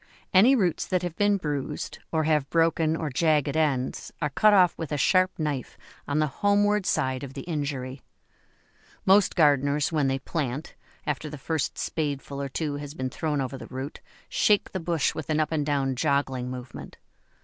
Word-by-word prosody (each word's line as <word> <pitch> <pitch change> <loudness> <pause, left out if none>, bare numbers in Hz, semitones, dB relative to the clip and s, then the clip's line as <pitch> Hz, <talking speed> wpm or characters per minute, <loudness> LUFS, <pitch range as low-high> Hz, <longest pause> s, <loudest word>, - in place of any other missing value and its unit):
Any 225 +9 +7
roots 185 -9 0
that 185 -2 0
have 175 -2 -3
been 205 +1 +3
bruised, 145 -6 -4
or 160 -1 +1
have 150 -3 +1
broken 165 -1 +2
or 160 -3 -3
jagged 150 0 +2
ends, 140 -5 0
are 150 -3 -1
cut 215 +9 +5
off 185 -4 +5
with 160 -3 -6
a 150 - 0
sharp 185 +5 +3
knife 150 -5 -3 0.3
on 145 - 0
the 155 - +3 0.2
homeward 205 0 +3
side 130 -4 0
of 135 -1 -8
the 135 - -5
injury. 140 -5 -4 1.0
Most 195 +1 +5
gardeners 145 -1 +3
when 150 -4 +1
they 135 0 +1
plant, 140 0 -4 0.3
after 150 +1 -2
the 150 - -7
first 150 0 -2
spadeful 140 -2 -3
or 140 - -3
two 145 +1 -2
has 145 +1 -7
been 130 -2 -3
thrown 150 0 -1
over 130 0 -4
the - - -9
root, 135 +3 -6 0.3
shake 210 -1 +2
the 190 - -3
bush 165 -3 0
with 155 - -6
an 155 0 +1
up 155 - 0
and 150 -2 -1
down 135 -2 +1
joggling 135 -2 0
movement. 125 -1 -8
150 Hz, 180 wpm, -26 LUFS, 140-165 Hz, 1.0 s, Any